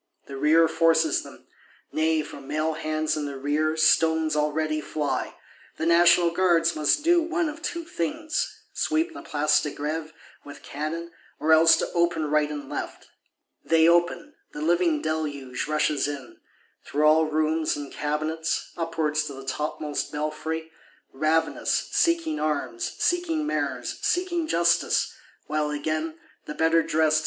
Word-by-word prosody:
The 140 Hz, -, -8 dB
rear 155 Hz, +4 st, +4 dB
forces 160 Hz, -1 st, +2 dB
them; -, -, -14 dB, 0.5 s
nay, 160 Hz, 0 st, +1 dB
from 140 Hz, -2 st, -11 dB
male 155 Hz, +2 st, -1 dB
hands 155 Hz, 0 st, -1 dB
in 150 Hz, -1 st, -3 dB
the 140 Hz, -1 st, -6 dB
rear, 150 Hz, +3 st, 0 dB
stones 160 Hz, 0 st, +3 dB
already 155 Hz, +1 st, 0 dB
fly: 150 Hz, 0 st, -3 dB, 0.4 s
the -, -, -2 dB
National 170 Hz, 0 st, +5 dB
Guards 170 Hz, -2 st, +2 dB
must 155 Hz, -, +2 dB
do 345 Hz, +1 st, +4 dB
one 335 Hz, 0 st, -1 dB
of 305 Hz, +2 st, -7 dB
two 340 Hz, 0 st, -4 dB
things; 315 Hz, -, -3 dB
sweep 320 Hz, +2 st, 0 dB
the -, -, -8 dB
Place 150 Hz, 0 st, +2 dB
de 150 Hz, -, -3 dB
Grève 155 Hz, +2 st, -4 dB, 0.3 s
with 145 Hz, -, -12 dB
cannon, 160 Hz, +4 st, -5 dB, 0.3 s
or 155 Hz, +2 st, +3 dB
else 160 Hz, 0 st, +6 dB
open 170 Hz, -2 st, +1 dB
to -, -, -2 dB
right 150 Hz, 0 st, +2 dB
and 145 Hz, -2 st, -6 dB
left. -, -, -6 dB, 0.5 s
They 165 Hz, 0 st, +4 dB
open; 175 Hz, -, +2 dB, 0.2 s
the 150 Hz, -, -6 dB
living 170 Hz, -2 st, +2 dB
deluge 150 Hz, -5 st, -3 dB
rushes 150 Hz, -1 st, +1 dB
in. 140 Hz, -4 st, -7 dB, 0.5 s
Through 150 Hz, +2 st, 0 dB
all 155 Hz, +1 st, +5 dB
rooms 155 Hz, +1 st, 0 dB
and 145 Hz, -1 st, -7 dB
cabinets, 155 Hz, +2 st, -2 dB
upwards 160 Hz, -2 st, -1 dB
to 145 Hz, -, -6 dB
the 135 Hz, 0 st, -10 dB
topmost 150 Hz, +2 st, -3 dB
belfry: 160 Hz, +2 st, -4 dB, 0.4 s
ravenous; 155 Hz, +3 st, 0 dB
seeking 335 Hz, -2 st, +1 dB
arms, 135 Hz, -6 st, -2 dB
seeking 335 Hz, -3 st, 0 dB
Mayors, 305 Hz, -, -2 dB
seeking 345 Hz, -2 st, 0 dB
justice;—while, 165 Hz, -, 0 dB
again, 155 Hz, +2 st, -3 dB, 0.3 s
the 150 Hz, -, -6 dB
better 165 Hz, +1 st, +3 dB
cressed -, -, -7 dB
(dressed?) 155 Hz, 0 st, +3 dB
155 Hz, 145 wpm, -25 LUFS, 150-170 Hz, 0.5 s, else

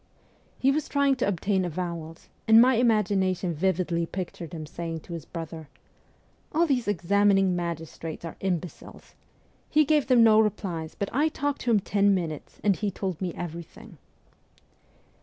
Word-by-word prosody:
He 270 Hz, -, +3 dB
was 300 Hz, +1 st, -2 dB
trying 280 Hz, -1 st, +2 dB
to 250 Hz, -, 0 dB
obtain 190 Hz, 0 st, 0 dB
avowals, 170 Hz, -1 st, -5 dB, 0.2 s
and 220 Hz, 0 st, +8 dB
my 255 Hz, +2 st, +6 dB
imagination 195 Hz, -6 st, +1 dB
vividly 170 Hz, 0 st, 0 dB
pictured 175 Hz, -2 st, -6 dB
him 160 Hz, -3 st, -6 dB
saying 165 Hz, +1 st, -5 dB
to 170 Hz, -, -10 dB
his 165 Hz, -4 st, -6 dB
brother: 165 Hz, -3 st, -7 dB, 0.4 s
' -, -, -37 dB
All 330 Hz, +2 st, +3 dB
these 260 Hz, -7 st, 0 dB
examining 195 Hz, 0 st, +3 dB
magistrates 165 Hz, -1 st, -5 dB
are 165 Hz, -, -7 dB
imbeciles. 180 Hz, -3 st, -5 dB, 0.6 s
He 305 Hz, 0 st, +4 dB
gave 300 Hz, -1 st, +2 dB
them 250 Hz, -3 st, +6 dB
no 220 Hz, -1 st, +6 dB
replies, 190 Hz, -7 st, -1 dB
but 200 Hz, -, -4 dB
I 295 Hz, +5 st, +2 dB
talked 285 Hz, -2 st, -2 dB
to 245 Hz, -, -2 dB
him 215 Hz, -3 st, +4 dB
ten 200 Hz, 0 st, +2 dB
minutes, 160 Hz, -5 st, -5 dB
and 200 Hz, -2 st, +3 dB
he 210 Hz, +1 st, -2 dB
told 190 Hz, -3 st, -4 dB
me 180 Hz, -2 st, -1 dB
everything.' 170 Hz, -1 st, -8 dB
190 Hz, 160 wpm, -26 LUFS, 170-220 Hz, 0.6 s, and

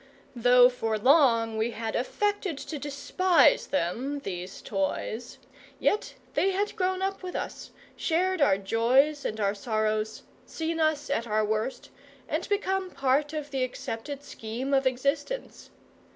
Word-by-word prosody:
Though 245 Hz, +1 st, +7 dB
for 225 Hz, -3 st, -1 dB
long 230 Hz, -3 st, +4 dB
we 225 Hz, +2 st, +1 dB
had 225 Hz, -1 st, -4 dB
affected 400 Hz, -, -1 dB
to 300 Hz, +1 st, -6 dB
despise 290 Hz, +3 st, +3 dB
them, 265 Hz, +5 st, -1 dB
these 180 Hz, -3 st, -6 dB
toys, 215 Hz, +4 st, -3 dB, 0.4 s
yet 420 Hz, -, 0 dB, 0.2 s
they 385 Hz, -, +2 dB
had 400 Hz, +2 st, -1 dB
grown 375 Hz, -2 st, 0 dB
up 390 Hz, 0 st, -2 dB
with 365 Hz, -1 st, -6 dB
us, -, -, -5 dB, 0.3 s
shared 365 Hz, +1 st, 0 dB
our 235 Hz, -9 st, +5 dB
joys 250 Hz, +9 st, +2 dB
and 220 Hz, -, -3 dB
our 200 Hz, -1 st, +1 dB
sorrows, 215 Hz, 0 st, -1 dB, 0.2 s
seen 325 Hz, 0 st, -3 dB
us 310 Hz, -3 st, +1 dB
at 235 Hz, -4 st, 0 dB
our 215 Hz, 0 st, +1 dB
worst, 220 Hz, +4 st, -2 dB, 0.4 s
and 315 Hz, +3 st, -2 dB
become 385 Hz, -2 st, 0 dB
part 275 Hz, 0 st, +1 dB
of 300 Hz, -2 st, -5 dB
the 265 Hz, -2 st, 0 dB
accepted 255 Hz, +3 st, -5 dB
scheme 240 Hz, +5 st, -5 dB
of 270 Hz, -1 st, +3 dB
existence. 280 Hz, -, -2 dB
270 Hz, 140 wpm, -28 LUFS, 225-320 Hz, 0.4 s, Though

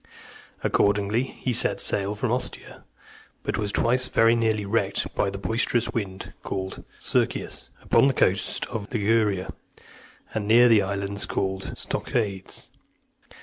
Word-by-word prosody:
Accordingly, 100 Hz, +3 st, +2 dB
he 130 Hz, -1 st, -3 dB
set -, -, +2 dB
sail 100 Hz, +1 st, +1 dB
from 110 Hz, +2 st, -1 dB
Ostia, 125 Hz, +1 st, -3 dB, 0.6 s
but -, -, -2 dB
was 105 Hz, -1 st, -1 dB
twice 125 Hz, +4 st, +2 dB
very 115 Hz, -1 st, +4 dB
near 115 Hz, -2 st, +2 dB
being 105 Hz, -2 st, -4 dB
wrecked 100 Hz, -3 st, 0 dB
by 100 Hz, -, +1 dB
the 100 Hz, -, -6 dB
boisterous 115 Hz, +3 st, 0 dB
wind 95 Hz, -4 st, -5 dB
called 95 Hz, 0 st, -5 dB, 0.2 s
Circius, -, -, -1 dB
upon -, -, +4 dB
the 135 Hz, -, +2 dB
coast 95 Hz, +1 st, +1 dB
of 110 Hz, -3 st, -6 dB
Liguria, 105 Hz, -4 st, +1 dB, 0.8 s
and 105 Hz, -2 st, -2 dB
near 120 Hz, +3 st, +7 dB
the 115 Hz, -3 st, +6 dB
islands 100 Hz, +1 st, -2 dB
called 95 Hz, 0 st, -2 dB
Stoechades. 100 Hz, -5 st, -3 dB
105 Hz, 135 wpm, -25 LUFS, 100-115 Hz, 0.8 s, near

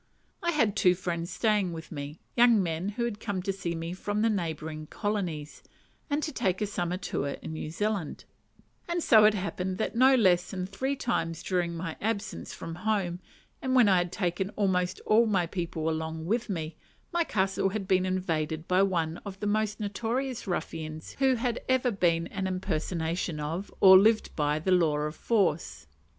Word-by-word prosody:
I 345 Hz, -, 0 dB
had 230 Hz, -11 st, +2 dB
two 180 Hz, -3 st, +4 dB
friends 170 Hz, -1 st, -3 dB
staying 195 Hz, 0 st, +1 dB
with 160 Hz, 0 st, -8 dB
me, 145 Hz, 0 st, -6 dB, 0.2 s
young 235 Hz, -4 st, +5 dB
men 170 Hz, +3 st, -2 dB
who 235 Hz, +3 st, -2 dB
had 220 Hz, -3 st, -4 dB
come 200 Hz, -4 st, -3 dB
to 195 Hz, 0 st, -1 dB
see 175 Hz, -3 st, -3 dB
me 165 Hz, +1 st, -4 dB
from 205 Hz, +3 st, -2 dB
the 225 Hz, -, +3 dB
neighbouring 160 Hz, -5 st, -3 dB
colonies, 180 Hz, -9 st, -3 dB, 0.5 s
and 295 Hz, +1 st, 0 dB
to 310 Hz, -, -2 dB
take 190 Hz, -9 st, 0 dB
a 210 Hz, -, +1 dB
summer 180 Hz, -3 st, -2 dB
tour 145 Hz, -6 st, -3 dB
in 160 Hz, -, -6 dB
New 155 Hz, -, -5 dB
Zealand; 200 Hz, -1 st, -2 dB, 0.6 s
and 345 Hz, 0 st, -1 dB
it -, -, 0 dB
so 215 Hz, -1 st, +7 dB
happened 190 Hz, -2 st, -3 dB
that 220 Hz, -, -2 dB
no 260 Hz, +3 st, +6 dB
less 185 Hz, -6 st, +3 dB
than 185 Hz, -1 st, -3 dB
three 265 Hz, +9 st, -2 dB
times 165 Hz, -, -2 dB
during 175 Hz, -2 st, -1 dB
my 165 Hz, -1 st, -5 dB
absence 200 Hz, -, -3 dB
from 165 Hz, -, -7 dB
home, 195 Hz, -5 st, 0 dB, 0.4 s
and 260 Hz, -1 st, 0 dB
when 245 Hz, -4 st, +6 dB
I 190 Hz, -2 st, +5 dB
had 175 Hz, -1 st, 0 dB
taken 185 Hz, 0 st, -1 dB
almost 180 Hz, -3 st, +1 dB
all 225 Hz, +2 st, +5 dB
my 190 Hz, -5 st, +2 dB
people 170 Hz, -2 st, -3 dB
along 160 Hz, 0 st, -2 dB
with 225 Hz, +5 st, -1 dB
me, 160 Hz, -4 st, -4 dB, 0.4 s
my 345 Hz, 0 st, +3 dB
castle 195 Hz, -7 st, 0 dB
had 195 Hz, -1 st, -4 dB
been 185 Hz, -2 st, +3 dB
invaded 160 Hz, -4 st, -2 dB
by 185 Hz, +1 st, +3 dB
one 170 Hz, -4 st, 0 dB
of 195 Hz, -2 st, -9 dB
the -, -, -3 dB
most 210 Hz, 0 st, 0 dB
notorious 235 Hz, +4 st, -2 dB
ruffians 160 Hz, -3 st, -4 dB
who 265 Hz, -1 st, +4 dB
had 240 Hz, 0 st, -1 dB
ever 260 Hz, -1 st, +3 dB
been 170 Hz, -4 st, +1 dB
an 195 Hz, -2 st, -3 dB
impersonation 170 Hz, -2 st, -2 dB
of, 165 Hz, +6 st, -4 dB
or 190 Hz, -1 st, +9 dB
lived 220 Hz, +2 st, +3 dB
by, 150 Hz, -1 st, +1 dB
the 165 Hz, +5 st, -1 dB
law 165 Hz, -5 st, +3 dB
of 150 Hz, +1 st, -2 dB
force. 195 Hz, -8 st, 0 dB
185 Hz, 185 wpm, -28 LUFS, 165-215 Hz, 0.6 s, or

